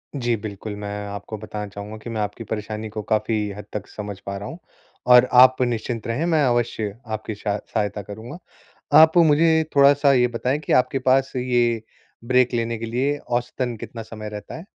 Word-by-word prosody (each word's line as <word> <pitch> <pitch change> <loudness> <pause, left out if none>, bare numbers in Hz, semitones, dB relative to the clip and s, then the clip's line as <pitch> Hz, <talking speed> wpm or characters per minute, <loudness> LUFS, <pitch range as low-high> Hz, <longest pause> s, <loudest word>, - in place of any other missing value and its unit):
जी, 120 -3 0
बिल्कुल, 105 -1 -6
मैं 105 0 -5
आपको 100 +2 -6
बताना 105 0 -6
चाहूँगा 100 +2 -8
कि - - -6
मैं 110 -2 -2
आपकी 105 +2 -4
परेशानी 110 0 -5
को 110 0 -5
काफ़ी 110 -1 0
हद 105 - -8
तक 105 -1 -5
समझ 105 -2 -7
पा 100 0 -6
रहा 100 - -6
हूँ 160 - -8 0.5
और 125 0 +8
आप 130 0 +6
निश्चिंत 120 -1 -2
रहें, 120 +8 -1
मैं 160 -4 +2
अवश्य 115 -4 -1
आपकी 110 -1 -5
सह 105 0 -2 0.2
सहायता 105 -2 -1
करूँगा। 110 - -9 0.6
आप 160 +2 +5
मुझे 160 0 +5
थोड़ा-सा 140 0 +5
ये 125 -2 +4
बताएँ 125 +4 -1
कि 155 - -2
आपके 130 +1 +2
पास 135 +1 +3
ये 120 -2 +1 0.4
ब्रेक 125 0 +3
लेने 115 -1 -1
के 115 - -5
लिए 135 +6 0
औसतन 125 0 -3
कितना 115 - -7
समय 110 -1 -8
रहता 105 -1 -8
है? 165 - -10
115 Hz, 185 wpm, -22 LUFS, 105-130 Hz, 0.6 s, और